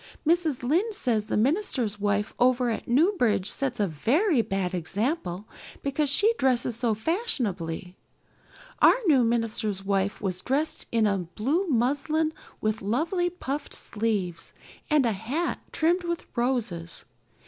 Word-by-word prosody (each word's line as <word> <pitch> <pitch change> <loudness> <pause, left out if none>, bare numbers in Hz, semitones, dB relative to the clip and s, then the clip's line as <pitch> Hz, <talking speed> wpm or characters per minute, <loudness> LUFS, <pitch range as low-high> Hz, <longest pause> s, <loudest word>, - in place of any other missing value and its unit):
Mrs. 325 -6 +2
Lynde 365 - +1
says 225 - 0
the - - 0
minister's 245 - 0
wife 205 +1 0
over 250 -1 +3
at 220 - -4
Newbridge 245 - +2
sets 265 -4 -2
a 205 - +3
very 255 - +2
bad 195 -4 -2
example 195 - -2 0.4
because 280 +1 0
she 410 +11 +4
dresses 250 -3 +2
so 230 -2 0
fashionably. 205 - -2 0.9
Our - - +7
new 280 -8 +5
minister's 225 -4 -1
wife 195 0 0
was 185 -3 -3
dressed 285 +5 -1
in 230 -2 +3 0.3
blue 310 - 0
muslin 290 +4 +1 0.3
with 215 0 -1
lovely 325 - 0
puffed 295 -5 -5
sleeves 205 -6 -2 0.4
and 300 -4 +4
a 230 - +2
hat 245 - -2
trimmed 345 +3 +1
with 340 0 -3
roses. 235 -9 -2
245 Hz, 130 wpm, -26 LUFS, 210-310 Hz, 0.9 s, Our